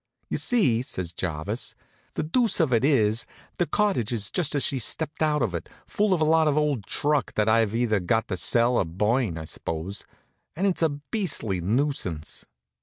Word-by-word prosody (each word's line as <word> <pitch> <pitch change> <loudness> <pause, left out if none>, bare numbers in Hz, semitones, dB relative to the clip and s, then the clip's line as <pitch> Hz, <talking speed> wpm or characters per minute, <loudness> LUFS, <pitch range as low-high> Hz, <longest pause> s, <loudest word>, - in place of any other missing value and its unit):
"You - - 0
see," 160 - +2
says 90 -8 -4
Jarvis, 80 -3 -3 0.4
"the - - -1
deuce 225 +9 +1
of 155 -7 +2
it 115 - +3
is 115 -6 +3 0.3
the 175 - +2
cottage 195 - +1
is 105 -4 0
just 155 -4 0
as 145 - +1
she 135 - -1
stepped 155 +7 -2
out 150 -3 +2
of 110 - -1
it, 85 - -5 0.2
full 210 0 0
of 185 - +3
a - - +4
lot 160 0 +4
of 150 0 +2
old 145 -9 0
truck 145 -1 0
that 105 0 +1
I've 110 -1 +3
either 115 -3 +1
got 110 +5 0
to 95 - -1
sell 120 +7 +3
or - - +2
burn, 105 +3 0
I 80 - -6
suppose. 85 +5 -5 0.5
And 185 +5 -1
it's 190 -4 +1
a 160 - +4
beastly 145 - -2
nuisance." 95 - -2
120 Hz, 190 wpm, -25 LUFS, 100-155 Hz, 0.5 s, a